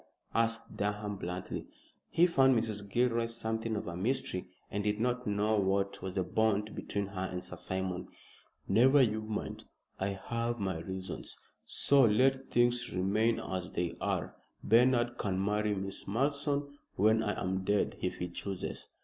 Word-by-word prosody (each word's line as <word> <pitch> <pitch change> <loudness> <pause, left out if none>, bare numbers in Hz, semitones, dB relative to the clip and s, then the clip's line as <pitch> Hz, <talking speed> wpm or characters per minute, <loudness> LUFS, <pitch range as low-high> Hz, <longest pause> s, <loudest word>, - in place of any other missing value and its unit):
asked 115 0 0
Durham, 105 0 -2
bluntly. 90 -1 -5 0.4
He 170 - +5
found 135 -7 +5
Mrs. 105 -3 -2
Gilroy 115 +1 +2
something 110 -1 -2
of 105 - -3
a 85 - -5
mystery, 95 -3 -1 0.2
and 105 - -1
did 105 0 0
not 125 +1 0
know 105 +1 +2
what 100 0 0
was 95 -1 -5
the 95 - +1
bond 110 +2 +1
between 100 0 -2
her 95 -1 -4
and 90 0 -4
Sir 90 - -7
Simon. 95 0 -3 0.6
"Never 130 +8 +6
you 110 -2 +1
mind. 110 0 -4 0.3
I 95 0 -2
have 115 0 -1
my 95 -4 -1
reasons, 95 +2 -5 0.3
so 140 -1 +4
let 130 +4 +3
things 120 0 +2
remain 105 +5 +2
as 95 -1 -4
they 85 -1 -1
are. - - -1 0.3
Bernard 120 +1 +4
can 95 -2 -1
marry 105 0 +1
Miss 95 0 -4
Malleson 140 +5 0 0.2
when 110 +3 +4
I 105 -2 -1
am 95 +1 -1
dead 100 +1 +1
if - - -2
he 90 - -2
chooses." 95 +2 -5
105 Hz, 160 wpm, -32 LUFS, 95-120 Hz, 0.6 s, Never